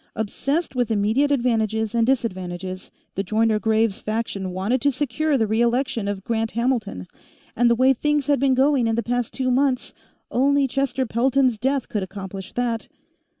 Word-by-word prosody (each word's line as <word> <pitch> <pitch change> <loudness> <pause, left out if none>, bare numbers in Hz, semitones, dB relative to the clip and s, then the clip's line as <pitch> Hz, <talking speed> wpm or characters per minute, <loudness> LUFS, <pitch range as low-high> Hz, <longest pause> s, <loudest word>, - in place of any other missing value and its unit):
Obsessed 275 +9 -2
with 245 -2 0
immediate 220 +7 +2
advantages 220 -5 0
and 230 -1 +2
disadvantages, 185 -7 -2 0.2
the 195 - -1
Joyner 215 +2 +1
Graves 220 0 +1
faction 215 -3 -3
wanted 195 +8 -1
to 285 - +3
secure 290 +3 0
the 225 - +2
re 220 +2 0
election 235 -3 0
of 200 -2 -3
Grant 225 0 -1
Hamilton, 235 - -1 0.5
and 240 +1 +3
the 235 - +4
way 260 +3 +4
things 295 +2 0
had 285 -1 +2
been 265 -1 +3
going 265 -2 +3
in 225 - +1
the 235 - -1
past 245 +1 -1
two 255 -1 -1
months, 260 0 +1 0.4
only 280 +2 +3
Chester 265 0 -1
Pelton's 255 0 +1
death 270 +2 0
could 210 - -2
accomplish 190 0 -7
that. 235 -2 -2
235 Hz, 170 wpm, -23 LUFS, 215-265 Hz, 0.5 s, the